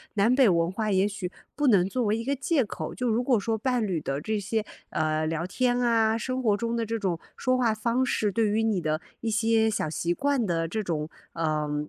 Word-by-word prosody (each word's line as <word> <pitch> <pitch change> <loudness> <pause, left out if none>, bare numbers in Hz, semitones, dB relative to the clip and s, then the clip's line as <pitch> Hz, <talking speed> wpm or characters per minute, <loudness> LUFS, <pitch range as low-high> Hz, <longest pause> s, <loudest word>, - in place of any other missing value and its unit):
南 220 +5 +4
北 265 -2 +6
文 170 0 +2
化 215 +1 -1
也 190 +1 +3
许 190 -3 -5 0.2
不 295 -2 +1
能 190 -5 +5
作 250 +4 -1
为 210 0 +2
一 230 - -4
个 275 +3 0
借 275 +1 +1
口。 210 - -6
就 250 -2 -1
如 230 +3 +1
果 245 -4 +3
说 225 +2 -1
伴 245 0 0
侣 180 -5 -1
的 135 0 -2
这 215 +3 -1
些， 215 +2 -1 0.3
呃， 155 0 0
聊 165 +1 -2
天 245 +5 +1
啊， 225 -2 +3
生 255 +3 -2
活 210 -3 +3
中 230 +1 -2
的 230 -1 -1
这 230 +1 -2
种 180 -5 -1 0.2
说 255 0 +1
话 235 -3 +2
方 235 +4 0
式， 210 -4 0
对 225 +2 +1
于 220 +2 +1
你 220 -4 +1
的 155 0 0 0.2
一 230 - -1
些 225 0 +3
小 205 -7 -1
习 170 +2 -1
惯 275 +3 +1
的 165 -2 0
这 215 +6 -2
种， 155 -3 -2 0.2
呃， 150 -2 -1
220 Hz, 250 characters per minute, -27 LUFS, 175-235 Hz, 0.3 s, 北